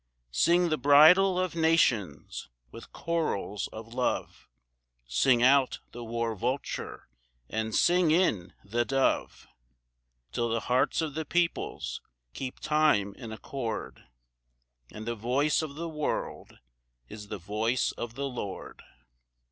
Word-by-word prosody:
II. - - -49
Sing 170 - +3
the 155 - 0
bridal 160 +7 +6
of 185 -2 -1
nations! 160 - +1 0.2
with - - -12
chorals 155 - -2
of 115 +1 -9
love 125 0 -2 0.6
Sing 120 - +3
out 130 0 +4
the 120 - -8
war 115 0 -2
vulture 125 +6 -4 0.4
and 110 -1 -3
sing 175 -1 +4
in 130 - +2
the 115 +4 0
dove, 135 +2 0 0.9
Till 120 -1 -1
the 115 0 0
hearts 125 +6 +1
of 155 -3 -3
the 160 +2 -3
peoples 170 +2 -1 0.3
keep 130 -1 -6
time 150 -11 +2
in 115 0 -9
accord, 115 0 -5 0.9
And 110 +1 -8
the 120 - -2
voice 125 +8 +1
of 150 -3 -6
the 170 +2 -4
world 150 -2 -4 0.5
is 105 - -10
the - - -5
voice 105 +7 -1
of 120 -1 -7
the 140 +1 -2
Lord! 120 -7 -7
125 Hz, 130 wpm, -28 LUFS, 110-155 Hz, 0.9 s, bridal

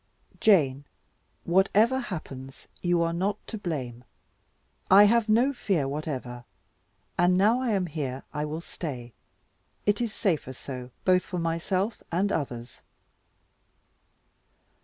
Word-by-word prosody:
"Jane, 145 - +4 0.6
whatever 205 +8 +3
happens, 135 - -7 0.2
you 175 -1 +2
are 165 0 0
not 195 +4 0
to - - -6
blame. 135 - -4 0.9
I 195 +2 +9
have 225 +1 +4
no 245 +6 +4
fear 185 - 0
whatever; 135 -4 -4 0.8
and 180 +1 +4
now 220 +6 +4
I 255 - 0
am 190 -2 +1
here, 140 -5 -4
I 150 - -2
will 155 +2 -4
stay. 125 -9 -7 0.7
It 205 +2 +2
is 235 -2 -1
safer 160 -11 -1
so, 125 -1 -8 0.2
both 185 -1 +5
for 180 - -5
myself 175 +5 -1
and 190 +4 +1
others." 120 -7 -4
170 Hz, 120 wpm, -27 LUFS, 140-205 Hz, 0.9 s, I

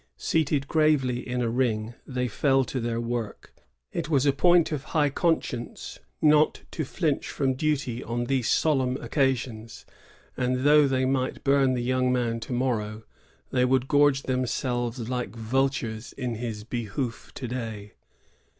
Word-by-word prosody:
Seated 150 -3 0
gravely 150 -6 +2
in 125 0 -2
a 115 - 0
ring, 115 -2 0
they 125 -2 -1
fell 135 +4 +2
to 130 - -4
their 115 -1 -2
work. 115 -2 -4 0.4
It 150 - -3
was 140 -3 +3
a 140 - +4
point 175 +4 +4
of 145 -3 -2
high 145 -2 +3
conscience 140 -7 -2 0.2
not 150 0 +4
to 160 - -3
flinch 150 +1 -1
from 135 -2 0
duty 135 -4 -1
on 120 +1 -2
these 125 -1 0
solemn 130 -5 +2
occasions; 125 -6 -2 0.5
and 125 0 0
though 150 0 +6
they 130 -1 +1
might 130 -1 -1
bum 135 -2 +3
the 120 - -2
young 130 0 +1
man 120 -2 0
to 115 - -8
morrow, 110 -4 -1 0.5
they 125 - +2
would 130 0 +2
gorge 145 -1 +4
them 130 -1 -1
selves 120 -2 -2
like 125 -4 -3
vultures 115 -1 -1
in 125 -3 -3
his 110 -2 -5
behoof 115 +1 -4
to 130 - -5
day. 110 -4 -5
130 Hz, 155 wpm, -26 LUFS, 120-140 Hz, 0.5 s, though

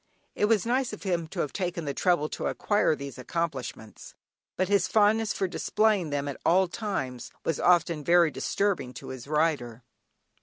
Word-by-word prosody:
It - - +1
was 215 -2 +2
nice 250 0 0
of 210 - -8
him 175 -4 -1
to - - -3
have 145 - -3
taken 175 -4 -3
the 140 - -2
trouble 175 -1 +2
to - - -3
acquire 205 -6 +1
these 140 -3 -8
accomplishments, 130 -7 -5 0.4
but 185 - +1
his 200 -2 +2
fondness 215 0 +3
for 190 - -1
displaying 205 -1 +1
them 145 0 -2
at 140 - -6
all 185 +2 +4
times 175 - -4 0.2
was 165 - 0
often 170 -3 +3
very 170 0 +4
disturbing 185 -7 -1
to - - -8
his 130 -1 -8
rider. 145 -6 0
170 Hz, 175 wpm, -27 LUFS, 140-200 Hz, 0.4 s, all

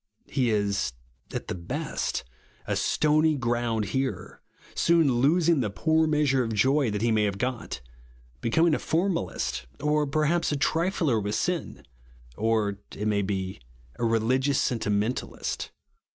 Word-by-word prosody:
He 125 -3 0
is, 100 - 0 0.4
at - - -4
the - - -2
best, 85 -1 -3 0.4
a - - -1
stony 155 0 +2
ground 120 -3 0
hearer; 135 0 -3 0.3
soon 165 -7 +3
losing 165 +2 +4
the 110 -5 0
poor 160 +9 +2
measure 145 -4 +2
of 115 -1 -3
joy 135 +4 +3
that 105 0 -2
he 120 - +3
may 110 -1 +3
have 100 -1 -1
got; 115 - -3 0.6
becoming 160 +8 +3
a - - +1
formalist; 160 - -1
or 150 0 +1
perhaps 155 +4 +1
a 145 - 0
triller 160 - +1
vv^ith 105 +1 -2
sin; 175 - -2 0.5
or, 105 -1 0 0.2
it 105 - -2
may 105 -1 +2
be, 95 -3 -3 0.4
a - - -2
religious 125 +5 +2
sentimentalist. 110 0 -1
125 Hz, 135 wpm, -27 LUFS, 105-150 Hz, 0.6 s, losing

